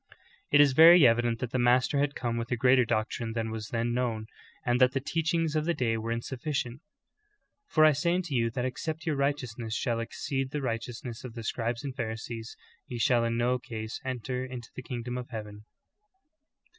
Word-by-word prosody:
"^ - - -37 0.4
10. 145 - +5
It - - +10
is 140 -2 +5
very 165 +2 +9
evident 120 0 +3
that 125 -2 -3
the 130 - 0
Master 125 +3 +3
had 145 0 0
come 120 -2 -2
with 115 0 -3
a - - +3
greater 125 +1 +4
doctrine 115 +1 -2
than 115 -1 -2
was 110 -1 -5
then 115 +1 -1
known, 120 -3 -1 0.4
and 120 +1 +2
that 130 0 +5
the 135 - +1
teach 160 +4 -1
ings 165 -2 0
of 155 0 +1
the 170 0 +1
day 115 -3 0
were 115 +1 -3
insufficient: 125 +2 -3 0.9
'Tor 155 -1 +6
I 155 - +7
say 170 +5 +1
unto 180 -5 -2
you 115 -2 +2
that 125 +2 -3
except 160 +6 -4
your 155 -3 0
righteousness 125 -5 -2
shall 115 -1 -1
exceed 135 +3 -3
the 150 +2 -3
righteousness 115 0 -4
of 125 -3 -8
the 115 - -6
scribes 115 +3 -2
and 135 -3 -5
Pharisees, 115 -1 -5 0.3
ye 125 - -5
shall 120 0 +3
in 115 0 0
no 125 +1 +1
case 115 -3 -6
enter 130 0 -3
into 125 -2 -8
the - - -6
kingdom 125 0 -4
of 125 - -8
heaven." 105 -3 -8
125 Hz, 205 wpm, -29 LUFS, 115-135 Hz, 0.9 s, It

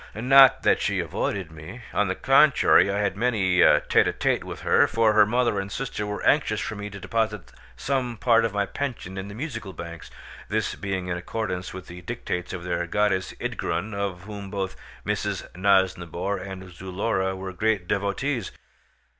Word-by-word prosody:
Not 130 +4 +6
that - - +3
she - - 0
avoided 95 -5 -3
me; 80 +10 -10
on 105 - +2
the 95 - -1
contrary 135 -5 +5
I 100 - -1
had 100 -1 0
many 100 -6 +2
a - - +6
tête - - +3
à - - 0
tête - - 0
with - - -8
her, - - +4
for 115 -1 +2
her 105 -1 +6
mother 120 -2 +1
and 95 0 -5
sister 115 -5 -4
were 105 0 -4
anxious - - +3
for - - -3
me 105 0 -6
to 100 0 -9
deposit 110 -2 -2 0.3
some 125 - -2
part 115 0 +4
of 115 - 0
my 100 0 0
pension 120 -8 -5
in 95 0 -5
the 100 - -9
Musical 115 -7 -5
Banks, 85 -2 -8 0.4
this - - -1
being 95 -2 -3
in 90 -1 -2
accordance 90 -1 -4
with 95 0 -8
the 90 0 -10
dictates 90 -3 -4
of 90 -2 -6
their 85 -1 -2
goddess 95 -1 0
Ydgrun, 105 +4 -3
of 100 -3 -3
whom 100 -1 -8
both 95 -1 -3 0.3
Mrs. - - -2
Nosnibor 95 -1 +1
and 95 -1 -8
Zulora 95 +1 -2
were 95 0 -6
great 105 -2 0
devotees. 100 +5 -1
100 Hz, 180 wpm, -25 LUFS, 95-110 Hz, 0.4 s, Not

